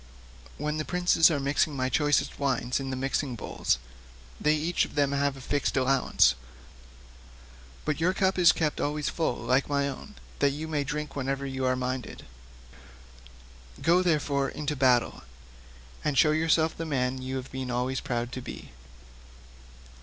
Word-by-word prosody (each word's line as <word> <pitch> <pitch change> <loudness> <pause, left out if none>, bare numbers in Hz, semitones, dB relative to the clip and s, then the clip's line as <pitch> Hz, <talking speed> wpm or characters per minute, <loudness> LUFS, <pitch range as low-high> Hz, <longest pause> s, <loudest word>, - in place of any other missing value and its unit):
When 150 +1 -2
the 155 - -1
princes 175 -1 +4
are 155 -4 0
mixing 140 +2 +1
my 130 -1 0
choicest 145 +2 +1
wines 125 -2 0
in 135 -1 -4
the 130 - -2
mixing 135 0 -2
bowls, 105 - -1 0.6
they 150 +1 +3
have 150 - -3
each 175 +1 +1
of - - -6
them 140 -1 +2
a 140 0 +1
fixed 135 +1 -2
allowance, 130 0 +3 1.5
but 150 0 -1
your 170 +3 +3
cup 190 0 +1
is 175 -1 +7
kept 155 -2 -1
always 150 0 -1
full 160 -7 -1
like 130 +4 0
my 140 -1 +1
own, 140 +10 -8 0.2
that 140 - +4
you 155 +2 -5
may 150 -2 -1
drink 150 +1 -4
whenever 135 0 -2
you 130 -1 -3
are 130 0 +2
minded. 130 0 -4 1.5
Go, 175 +2 +4
therefore, 145 -5 +1
into 150 0 -3
battle, 130 -3 +2 0.8
and 145 -3 0
show 150 - +5
yourself 160 +1 +2
the 165 - -4
man 130 -3 -1
you 130 +1 -4
have 130 0 -6
been 130 -1 -4
always 125 +2 -1
proud 120 0 -3
to 130 - -5
be." - - -9
140 Hz, 160 wpm, -28 LUFS, 130-155 Hz, 1.5 s, is